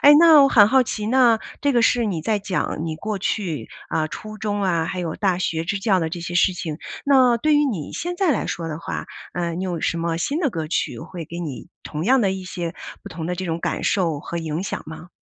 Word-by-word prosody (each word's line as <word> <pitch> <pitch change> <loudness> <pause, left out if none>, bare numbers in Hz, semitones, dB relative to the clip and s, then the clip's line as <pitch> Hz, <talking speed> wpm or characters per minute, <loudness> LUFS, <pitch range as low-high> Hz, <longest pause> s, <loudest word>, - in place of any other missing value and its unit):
诶， 290 +1 +9
那 325 -3 +8
我 275 - +6
很 210 -6 +7
好 260 +4 +5
奇， 215 -3 -4
那， 240 -2 +5 0.2
这 285 - +2
个 240 -3 +3
是 235 0 +3
你 170 -6 -2
在 215 +2 +1
讲 190 -5 -2
你 160 -1 -3
过 210 +3 -3
去 185 -5 -2 0.2
啊， 155 -1 +1
初 215 +5 -8
中 205 -1 -2
啊 170 -4 +1
还 185 - -3
有 165 -3 -3
大 190 -4 +1
学 165 -3 -1
支 200 +3 -1
教 195 -2 +2
的 160 - -1
这 175 +1 -5
些 175 0 -5
事 185 +1 +4
情， 160 -3 -5 0.3
那 260 -4 +5
对 305 +6 +1
于 295 0 +4
你 190 - -3
现 355 +1 -4
在 355 -5 +3
来 - - -1
说 165 -1 -3
的 155 - -4
话， 165 - -5 0.3
呃， 170 -1 -2
你 180 +3 -3
有 175 -4 -3
什 170 - 0
么 165 0 -1
新 280 - -1
的 300 - +2
歌 165 -8 -4
曲 155 - -1
会 170 0 -8
给 170 +3 -6
你 155 -1 -6
同 155 +1 -4
样 260 -1 +4
的 195 - +2
一 190 -1 -5
些 175 -2 -5 0.3
不 - - -10
同 160 -1 -5
的 180 - -1
这 185 +1 -4
种 165 -1 -2
感 - - -2
受 165 -7 +1
和 170 +3 -5
影 160 +1 -3
响 - - -4
吗？ 160 +2 -9
185 Hz, 270 characters per minute, -22 LUFS, 165-225 Hz, 0.3 s, 诶